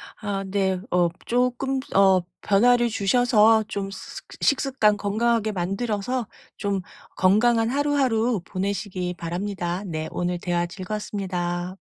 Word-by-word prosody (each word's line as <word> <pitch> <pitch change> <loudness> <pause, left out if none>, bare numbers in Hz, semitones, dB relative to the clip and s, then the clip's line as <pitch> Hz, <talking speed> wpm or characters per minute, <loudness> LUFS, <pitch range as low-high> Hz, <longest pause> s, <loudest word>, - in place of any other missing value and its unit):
아 200 -2 -3
네. 190 -1 0
어 175 -1 +3 0.2
쪼끔 250 +2 0 0.2
어 190 -2 +5 0.2
변화를 240 +4 +4
주셔서 220 +1 +4
좀 200 -2 -4
스 190 - -8 0.2
식습관 260 -7 +2
건강하게 220 +2 +1
만들어서 205 +5 -2 0.3
좀 200 -2 -1 0.3
건강한 225 +4 +3
하루하루 255 -6 +1
보내시기 185 -2 -3
바랍니다. 175 +1 -3
네 160 -3 -4
오늘 175 0 -2
대화 175 0 0
즐거웠습니다. 185 -2 -4
200 Hz, 265 characters per minute, -24 LUFS, 185-235 Hz, 0.3 s, 어